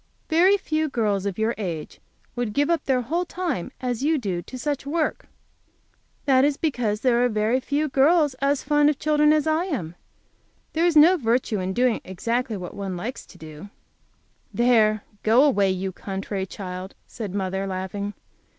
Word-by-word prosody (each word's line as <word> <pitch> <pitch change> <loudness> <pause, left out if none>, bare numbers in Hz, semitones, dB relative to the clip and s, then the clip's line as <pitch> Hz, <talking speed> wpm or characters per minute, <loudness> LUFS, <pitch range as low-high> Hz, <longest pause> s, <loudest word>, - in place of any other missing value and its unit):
"Very 365 +5 +5
few 315 -4 -1
girls 205 -6 0
of 195 - -4
your 220 +2 +1
age 170 -7 -5 0.4
would 240 -4 -2
give 290 +6 +1
up 335 -3 0
their 260 -2 +2
whole 335 +9 -1
time 345 - -3
as 245 -2 -3
you 310 +3 +2
do 190 -9 -3
to 255 - -9
such 280 +1 -3
work." 315 +1 -1 1.0
"That 265 -2 +4
is 285 0 +2
because 240 -9 -1
very 240 -1 +2
few 290 +3 -1
girls 295 +2 +3
are 275 - +2
as 285 -1 0
fond 295 +1 +3
of 300 - -1
children 300 0 +3
as 305 -1 +2
I 315 +2 +1
am. 225 - -4 0.8
There 330 +2 +2
is 340 - +1
no 340 +5 +7
virtue 235 - 0
in 185 +1 -2
doing 245 +1 +1
exactly 230 +5 -2
what 180 -2 -7
one 195 -2 -5
likes 235 +9 -5
best - - -32
to - - -16
do." 155 +4 -10 0.8
"There, 220 -3 +3 0.2
go 230 +5 +5
away, 205 -10 +3
you 190 0 -2
contrary 195 0 -5
child," 185 0 -7
said 205 -4 -7
mother, 190 0 -2
laughing. 195 +2 -4
245 Hz, 175 wpm, -24 LUFS, 200-295 Hz, 1.0 s, no